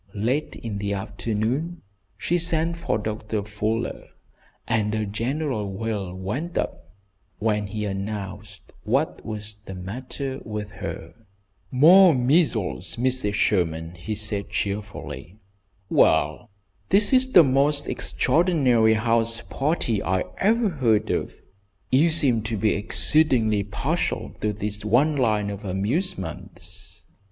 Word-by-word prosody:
Late 125 +9 -1
in 105 -3 -5
the 100 0 -2
afternoon 115 - -3 0.3
she 175 +1 0
sent 165 0 +1
for 140 -10 -1
Doctor 105 0 -3
Fuller, 105 +2 -3 0.6
and 110 -1 0
a 110 -1 -1
general 115 0 -2
wail 100 -3 -4
went 125 - -4
up - - -4 0.4
when 105 -1 0
he 105 +1 -4
announced 100 0 -6
what - - 0
was 105 -1 -7
the 95 - -7
matter 130 +8 -5
with 105 -1 -5
her. - - -7 0.6
"More 165 +6 +7
measles, 125 - +1
Mrs. 125 -4 0
Sherman," 80 -5 0
he 90 +5 -5
said, 105 -1 -1
cheerfully. 100 -5 -5 0.5
"Well, 80 +3 +2 0.4
this 205 +4 +3
is 260 0 +4
the 175 - +9
most 140 +2 +1
extraordinary 130 -8 +2
house 115 +1 +1
party 135 - 0
I 95 +2 0 0.2
ever 225 +2 +3
heard 115 - +1
of. - - -2 0.6
You 145 +6 +4
seem 140 -8 +4
to 110 -1 -2
be 105 +1 +2
exceedingly 110 -1 +4
partial 100 - -2
to 105 - +1
this 105 0 -4
one 130 +8 +3
line 105 -6 +1
of 100 +1 -8
amusements." 100 - -4
110 Hz, 120 wpm, -24 LUFS, 100-135 Hz, 0.6 s, the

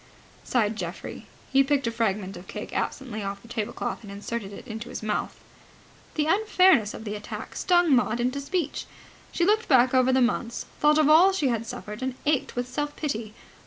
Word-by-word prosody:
sighed 225 -3 +1
Geoffrey. - - -6 0.3
He 275 0 +6
picked 280 -1 +1
a 230 - 0
fragment 210 -4 -1
of 180 - -11
cake - - -7
absently 245 -6 -3
off 200 0 -5
the - - -14
tablecloth 225 -1 -3
and 205 -3 -10
inserted 205 +1 -5
it 200 - -10
in 220 -2 -5
his 220 - -7
mouth. 215 -1 -2 0.8
The 300 - +1
unfairness 370 - +4
of - - -8
the 210 -2 -4
attack 210 0 -7
stung 350 -5 +4
Maud 240 -2 +2
to 255 +3 -1
speech. 305 +1 -2 0.4
She 345 - +1
looked 435 +3 +2
back 255 -2 +5
over 255 0 +4
the 260 - +3
months, 240 -1 0
thought 300 0 +5
of 310 -2 +4
all 340 +6 +7
she 300 -8 +1
had 230 -1 -1
suffered, 210 +1 -7
and 260 -1 -2
ached 290 -3 +1
with 245 0 -2
self 290 +3 -3
pity. 225 -7 -4
250 Hz, 195 wpm, -26 LUFS, 220-295 Hz, 0.8 s, all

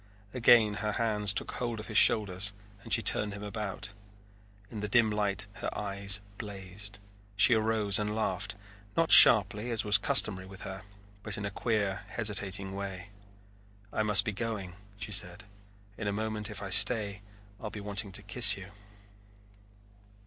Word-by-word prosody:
Again 115 -3 +3
her 105 -1 -3
hands 105 -3 0
took 100 - -3
hold 120 -3 -5
of 110 - -8
his 110 - -9
shoulders 100 -2 +3 0.3
and - - -14
she - - +2
turned 105 -1 +2
him 100 +1 -9
about. 105 0 -7 0.8
In 110 - -7
the 105 - -5
dim 110 +1 +1
light 105 -1 -1
her - - -6
eyes 100 0 +3 0.2
blazed. 100 -1 -9 0.4
She 115 +4 +4
arose 110 -3 +1
and 105 0 -4
laughed, 110 -1 -4 0.4
not 165 -1 0
sharply 105 +2 +7
as 115 -3 -3
was 105 0 +4
customary 95 -2 +2
with 95 +1 -14
her, 95 0 -8 0.4
but 105 -1 -5
in 105 - -6
a 100 - -5
queer, 100 -3 -3
hesitating 100 -3 -3
way. 100 -1 -8 0.8
"I - - -2
must 105 -3 +5
be 105 - -2
going," 105 -4 -6 0.2
she 100 +1 -7
said. 90 -3 -1 0.6
"In 110 - -5
a - - -1
moment, 110 +1 -5
if 105 -1 -9
I 100 - -7
stay, 105 0 +3 0.4
I'll 105 - -6
be 105 - -9
wanting 100 0 -3
to 105 0 -2
kiss 105 0 +5
you." 95 0 -12
105 Hz, 165 wpm, -28 LUFS, 100-110 Hz, 0.8 s, sharply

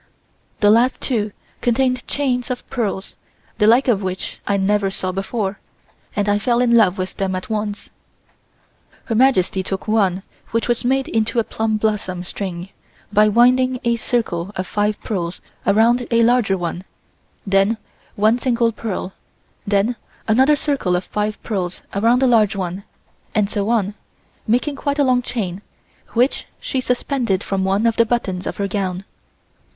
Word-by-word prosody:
The 205 -1 +6
last 240 +4 +3
two 215 -5 -1 0.3
contained 255 +1 +1
chains 250 -4 0
of 250 -1 -4
pearls, 210 -5 -3 0.4
the 210 - +4
like 240 +5 +5
of 220 -5 +3
which 185 -1 -4
I 200 - +2
never 200 0 +1
saw 185 -1 -2
before, 195 +1 -3 0.6
and 205 0 0
I 205 0 +2
fell 235 +2 +1
in 240 -1 +4
love 205 -4 +4
with 185 0 -4
them 190 -1 -1
at 185 +4 -5
once. 210 -1 -3 1.1
Her 230 - -2
Majesty 220 -6 +3
took 190 +2 -4
one 195 -4 +2 0.3
which 230 0 -1
was 240 -1 +1
made 265 +2 +1
into 225 +1 0
a 230 - +4
plum 220 0 -1
blossom 210 -4 -1
string 180 -1 -5 0.4
by 210 +1 +5
winding 250 +3 +4
a 235 -1 +2
circle 210 -6 -1
of 185 - -2
five 210 +2 -1
pearls 175 -5 -3 0.3
around 235 +4 +3
a 230 -1 +4
larger 230 -5 +3
one, 175 0 -4 0.6
then 195 +3 +2 0.4
one 215 +4 +3
single 235 -2 +1
pearl, 205 -4 -4 0.5
then 205 +4 +2 0.3
another 260 +7 +5
circle 275 - 0
of 180 - -1
five 210 +1 -2
pearls 185 -5 -3
around 230 +6 +3
a - - +5
large 220 -5 +4
one, 185 0 -4 0.5
and 210 -1 +2
so 205 -1 -1
on, 210 -4 +1 0.5
making 250 +6 +1
quite 285 +1 -2
a 290 - +4
long 255 -2 +3
chain, 200 -7 -4 0.5
which 245 +4 +1
she 260 - -2
suspended 245 -5 0
from 195 -1 -1
one 195 +3 +1
of 230 -1 +2
the 230 - +5
buttons 190 -6 -1
of - - -4
her 200 - -1
gown. 190 -2 -3
215 Hz, 160 wpm, -20 LUFS, 195-240 Hz, 1.1 s, The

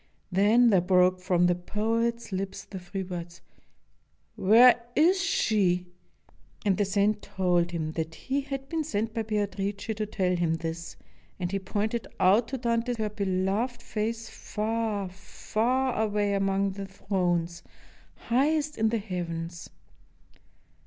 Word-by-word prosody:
Then 220 +6 +5
there 190 -3 +5
broke 180 0 +3
from 180 -1 +2
the 175 - +4
poet's 225 +6 -1
lips 190 0 -4
the 190 - -8
three 190 +2 -5
words, 175 -2 -7 1.0
"Where 235 +4 +6
is 360 +5 +4
she?" 185 - +2 0.8
And 200 -2 +3
the 205 - +2
saint 205 +2 +1
told 180 -3 +1
him 160 -3 -3
that 160 0 -4
he 275 +2 -2
had 270 -1 -6
been 320 +1 -1
sent 225 -6 -2
by 225 - -1
Beatrice 205 -2 -2 0.2
to 215 0 -2
tell 185 -3 0
him 170 -2 +1
this, 165 +1 -5 0.4
and 175 -1 -2
he 195 - 0
pointed 215 +4 -2
out 205 +6 +4
to 265 - -3
Dante 235 0 0
her 215 -1 -1
beloved 205 +4 -1
face 225 +1 -3
far, 215 -2 -2
far 225 +7 -1
away 205 -1 +1
among 195 0 +1
the 195 0 -6
thrones, 175 -3 -1 0.5
highest 295 +4 0
in 220 0 +3
the 230 - 0
heavens. 170 -4 -5
200 Hz, 140 wpm, -28 LUFS, 180-230 Hz, 1.0 s, Where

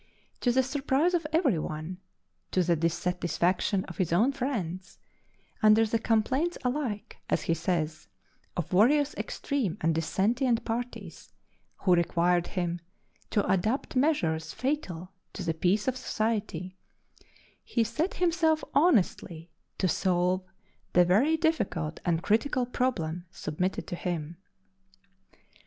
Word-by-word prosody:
To 245 - +2
the 260 +2 +3
surprise 280 +5 +1
of 335 -3 0
every 300 - +2
one 155 +4 -5 0.5
to 185 - +2
the 170 0 +2
dissatisfaction 180 +3 0
of - - -10
his 185 -5 0
own 215 +11 +4
friends 210 -10 -4 0.6
under 215 +1 +6
the 225 +1 0
complaints 255 +10 +1
alike 250 -5 -2
(as - - +1
he 165 - +1
says) 160 - -2 0.5
of 175 - -3
various 280 +10 +4
extreme 240 - -2
and 165 +1 +2
dissentient 230 - +1
parties, 240 +2 -5 0.5
who 185 - +5
required 175 0 +2
him 175 -2 -2 0.5
to 205 - +1
adopt 215 +11 0
measures 215 - +1
fatal 195 - -3 0.2
to 190 - -5
the 165 -2 0
peace 185 +7 +1
of 260 - +1
society 210 -7 -2 0.8
he 235 - +1
set 285 - -2
himself 325 -3 +2
honestly 180 - +2 0.3
to 190 - +1
solve 180 +1 +1 0.5
the 180 0 +6
very 250 - +3
difficult 190 - -1
and 170 0 0
critical 245 +5 +1
problem 180 -10 -2
submitted 180 +5 -3
to - - -5
him. 170 -2 -4
200 Hz, 125 wpm, -28 LUFS, 175-260 Hz, 0.8 s, under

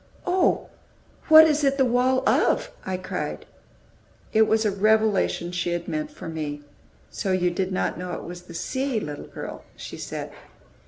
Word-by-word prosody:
"Oh, 365 0 +2 0.6
what 315 0 +10
is 305 -1 +2
it 275 0 +2
the 265 - +4
wall 250 +1 +2
of?" - - +2 0.2
I 185 - -1
cried. 185 - -5 0.9
It 220 0 +5
was 220 0 +2
a 210 - +3
revelation 210 -3 +2
she 175 -1 -1
had 175 0 -3
meant 305 -1 -2
for 295 - -10
me. 150 -2 -4 0.5
"So 195 - -2
you 180 -1 +2
did 185 +2 -2
not 185 - -1
know 180 -1 -5
it - - -5
was 175 0 -8
the 170 - -11
sea, 260 +3 -1
little 150 -7 -6
girl!" - - -8
she - - -8
said. - - -5
210 Hz, 170 wpm, -25 LUFS, 175-265 Hz, 0.9 s, what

